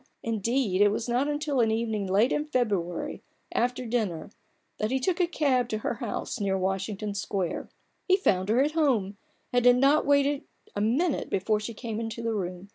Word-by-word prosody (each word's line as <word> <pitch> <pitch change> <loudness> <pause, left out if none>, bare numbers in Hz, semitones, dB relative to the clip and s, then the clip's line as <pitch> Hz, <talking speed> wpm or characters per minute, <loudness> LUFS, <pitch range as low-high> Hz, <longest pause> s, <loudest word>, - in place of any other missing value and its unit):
Indeed, 230 -2 0
it 205 - +7
was 220 +3 -2
not 245 +4 +1
till 290 -3 0
an 225 -2 +4
evening 220 -3 -1
late 205 +6 +3
in 295 - 0
February, 205 - -1 0.3
after 245 +1 0
dinner, 210 -8 -2 0.5
that 215 - 0
he 265 +2 +1
took 350 +7 0
a 350 - +3
cab 270 -7 +1
to 215 - -1
her 215 - -2
house - - -4
near 195 -2 0
Washington 195 +2 -2
Square. 195 -2 -3 0.4
Fie 375 - +6
found 190 - +1
her 240 +5 +4
at 295 - 0
home, 245 -11 +1 0.4
and 245 -1 +3
had 245 0 +6
not 280 +4 +4
waited 285 0 +3 0.3
a 205 - -1
minute 275 +9 +1
before 210 +3 +1
she 220 +2 -6
came 225 -1 -4
into 230 0 -4
the 230 -1 0
room. 185 -1 -4
230 Hz, 190 wpm, -27 LUFS, 200-265 Hz, 0.5 s, it